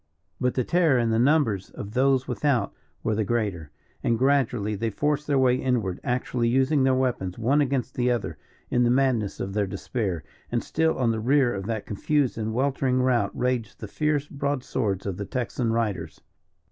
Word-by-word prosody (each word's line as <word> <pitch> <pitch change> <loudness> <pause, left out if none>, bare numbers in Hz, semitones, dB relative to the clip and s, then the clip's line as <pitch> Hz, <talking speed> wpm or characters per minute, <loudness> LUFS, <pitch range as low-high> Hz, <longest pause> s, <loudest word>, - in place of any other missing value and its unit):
But 125 -1 0
the 125 - +1
terror 165 -2 +3
and 115 -2 +1
the 110 - +2
numbers 120 - +2
of 105 - -8
those 130 +2 +2
without 130 -8 0 0.3
were 110 - +1
the 110 +1 +1
greater; 100 -8 -2 0.3
and 115 - +2
gradually 125 -5 +1
they 110 +3 -1
forced 150 +7 -1
their 145 -2 +2
way 130 -1 +4
inward, 120 -9 -1
actually 125 -1 -1
using 135 +4 +2
their 130 0 +3
weapons, 120 -9 -1
one 130 +6 +2
against 130 -2 -1
the 125 0 +1
other, 85 -11 -2 0.3
in 125 - +2
the 120 - +3
madness 125 -5 +1
of 95 - -4
their 105 -1 0
despair. 95 -3 -3 0.3
And 120 -1 0
still 160 0 0
on 120 -3 +2
the 110 - -2
rear 130 +2 +3
of 95 0 -5
that 110 -2 -3
confused 140 +6 0
and 110 0 -3
weltering 130 +1 +1
route 120 -6 +2
raged 125 -4 -1
the 105 - -6
fierce 150 +5 0
broadswords 130 -9 -2
of 95 -3 -3
the 100 - -4
Texan 120 0 -2
riders. 100 -9 -2
120 Hz, 185 wpm, -25 LUFS, 105-135 Hz, 0.3 s, way